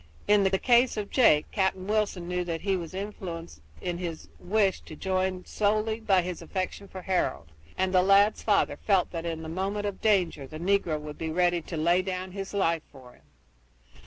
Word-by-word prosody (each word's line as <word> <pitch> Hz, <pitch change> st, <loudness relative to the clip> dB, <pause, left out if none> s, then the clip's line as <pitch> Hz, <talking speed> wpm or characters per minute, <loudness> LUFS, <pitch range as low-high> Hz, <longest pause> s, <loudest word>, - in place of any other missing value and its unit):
In 205 Hz, 0 st, +5 dB
the 190 Hz, 0 st, +2 dB
case 240 Hz, +2 st, +3 dB
of 205 Hz, -1 st, -4 dB
Jake, 155 Hz, -, +5 dB
Captain 190 Hz, -2 st, 0 dB
Wilson 205 Hz, -4 st, -1 dB
knew 180 Hz, 0 st, -1 dB
that 165 Hz, -2 st, -3 dB
he 195 Hz, -1 st, +1 dB
was 170 Hz, -1 st, -5 dB
influenced 175 Hz, -, -6 dB, 0.2 s
in 175 Hz, -1 st, -3 dB
his 170 Hz, -3 st, -6 dB
wish 195 Hz, 0 st, +1 dB
to 155 Hz, -, -11 dB
join 185 Hz, +1 st, -1 dB
solely 215 Hz, +1 st, 0 dB
by 195 Hz, -5 st, +3 dB
his 180 Hz, -1 st, -5 dB
affection 190 Hz, +1 st, -4 dB
for 190 Hz, -1 st, -9 dB
Harold, 80 Hz, -, -1 dB, 0.3 s
and 190 Hz, 0 st, 0 dB
the 185 Hz, -, +6 dB
lad's 200 Hz, +3 st, +4 dB
father 210 Hz, -2 st, +2 dB
felt 195 Hz, -4 st, +1 dB
that 170 Hz, -1 st, -4 dB
in 160 Hz, -1 st, -4 dB
the -, -, -6 dB
moment 195 Hz, +5 st, -2 dB
of 200 Hz, -2 st, -4 dB
danger 180 Hz, -10 st, +1 dB
the 155 Hz, -, -8 dB
negro 175 Hz, -3 st, +1 dB
would 150 Hz, 0 st, -9 dB
be 160 Hz, -, -3 dB
ready 175 Hz, +1 st, +2 dB
to 165 Hz, +1 st, -6 dB
lay 170 Hz, +4 st, +3 dB
down 185 Hz, 0 st, -4 dB
his 195 Hz, 0 st, -6 dB
life 170 Hz, -5 st, +1 dB
for 130 Hz, -3 st, -14 dB
him. -, -, -23 dB
185 Hz, 195 wpm, -28 LUFS, 170-200 Hz, 0.3 s, the